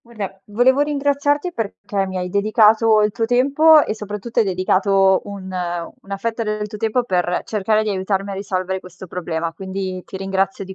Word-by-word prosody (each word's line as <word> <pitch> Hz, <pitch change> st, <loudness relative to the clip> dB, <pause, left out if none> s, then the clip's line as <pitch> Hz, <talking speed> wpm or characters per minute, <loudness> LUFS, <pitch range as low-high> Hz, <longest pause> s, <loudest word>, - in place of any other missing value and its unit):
Guarda, 205 Hz, -5 st, -7 dB
volevo 245 Hz, +6 st, +3 dB
ringraziarti 290 Hz, +2 st, 0 dB
perché 205 Hz, -, -3 dB
mi 190 Hz, 0 st, -6 dB
hai 180 Hz, 0 st, -2 dB
dedicato 215 Hz, +2 st, +4 dB
il 210 Hz, -, +2 dB
tuo 225 Hz, -, -1 dB
tempo 285 Hz, +6 st, +5 dB
e, 215 Hz, -, -2 dB
soprattutto, 210 Hz, +2 st, -5 dB
hai -, -, +3 dB
dedicato 190 Hz, +1 st, +3 dB
un 200 Hz, -2 st, -8 dB, 0.6 s
una 195 Hz, 0 st, -5 dB
fetta 230 Hz, +2 st, -3 dB
del 210 Hz, 0 st, -2 dB
tuo 210 Hz, 0 st, -9 dB
tempo 225 Hz, +3 st, +1 dB
per 180 Hz, -3 st, 0 dB
cercare 215 Hz, +1 st, +1 dB
di 215 Hz, -, -2 dB
aiutarmi 195 Hz, +1 st, -1 dB
a -, -, -4 dB
risolvere 190 Hz, -1 st, -3 dB
questo 185 Hz, 0 st, -12 dB
problema, 165 Hz, -2 st, -3 dB
quindi 190 Hz, 0 st, -5 dB
ti -, -, -8 dB
ringrazio 195 Hz, 0 st, -1 dB
di 190 Hz, 0 st, -9 dB
200 Hz, 180 wpm, -20 LUFS, 190-225 Hz, 0.6 s, tempo